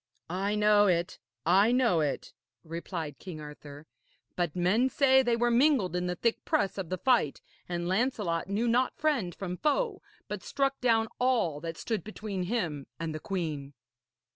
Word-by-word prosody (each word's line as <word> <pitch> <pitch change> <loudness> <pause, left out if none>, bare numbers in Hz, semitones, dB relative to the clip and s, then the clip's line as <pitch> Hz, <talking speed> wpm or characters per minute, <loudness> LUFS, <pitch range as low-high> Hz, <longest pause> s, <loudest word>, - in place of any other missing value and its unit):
'I 195 +3 0
know 210 -1 +5
it, 175 -2 0 0.3
I 195 +7 +5
know 245 -9 +3
it,' 150 -3 -2 0.3
replied 165 -4 -5
King 175 -5 -8
Arthur. 150 0 -10 0.5
'But 175 -4 -1
men 195 +9 +2
say 265 -1 +5
they 240 -2 +2
were 240 +1 +2
mingled 240 - +3
in 180 0 -1
the 180 - -1
thick 230 +5 0
press 200 0 0
of 180 -4 -4
the 185 - -2
fight, 235 - +2 0.3
and 175 -1 -2
Lancelot 190 -4 0
knew 215 +4 0
not 250 +2 +2
friend 265 - 0
from 180 -2 -5
foe, 390 - 0 0.3
but - - -5
struck 275 0 -1
down 225 -3 +3
all 240 - +1
that 165 -1 -5
stood 225 -3 -2
between 210 -3 -4
him 175 - -2
and 165 -1 -3
the 155 - -4
queen.' 150 -7 -4
195 Hz, 165 wpm, -29 LUFS, 170-240 Hz, 0.5 s, know